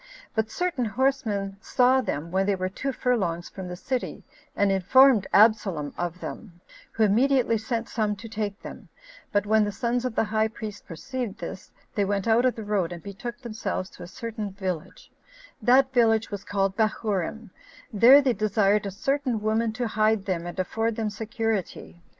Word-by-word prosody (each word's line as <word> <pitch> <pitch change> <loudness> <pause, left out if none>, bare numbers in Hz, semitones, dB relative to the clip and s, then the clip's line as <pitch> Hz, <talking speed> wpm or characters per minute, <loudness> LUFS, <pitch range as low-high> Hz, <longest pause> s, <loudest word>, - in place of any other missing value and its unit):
But 220 -1 0
certain 350 -9 -1
horsemen 215 -5 -1
saw 255 +5 +3
them 165 - -4
when 190 +1 +1
they 200 - +2
were 185 0 -2
two 275 +8 -3
furlongs 190 -10 -1
from 190 -2 -8
the 180 - -5
city, 250 +7 -4 0.3
and 200 -1 +2
informed 220 +3 +5
Absalom 200 -9 +3
of 175 0 -4
them, 175 -6 -8 0.3
who 225 - +2
immediately 235 +2 +3
sent 230 +1 -3
some 215 -3 -1
to 215 +3 -10
take 210 -2 -4
them; - - -10 0.4
but 205 -1 +1
when 215 +1 +4
the 205 - -1
sons 235 +4 -1
of 250 -3 -3
the - - +3
high 220 0 +1
priest 215 -2 -8
perceived 225 - -5
this, 190 - -7 0.2
they 205 - +1
went 200 +1 -1
out 230 +2 +4
of 255 - +2
the 225 - -6
road, 200 -5 0
and 170 -2 -8
betook 235 +5 -7
themselves 215 -5 -4
to - - -14
a 175 - -7
certain 215 +1 -5
village; 185 -3 -5 0.5
that 260 +4 +4
village 225 -3 +3
was 200 -1 -5
called 195 -1 -1
Bahurim; 215 -1 -1 0.4
there 250 +7 +7
they 260 -2 +2
desired 210 -1 +2
a - - -4
certain 260 +3 -1
woman 220 +2 0
to 245 +1 -2
hide 215 -2 +1
them, 175 -4 -2
and 175 - -7
afford 225 +4 -1
them 220 -1 -2
security. 220 -5 -3
215 Hz, 180 wpm, -26 LUFS, 195-235 Hz, 0.5 s, there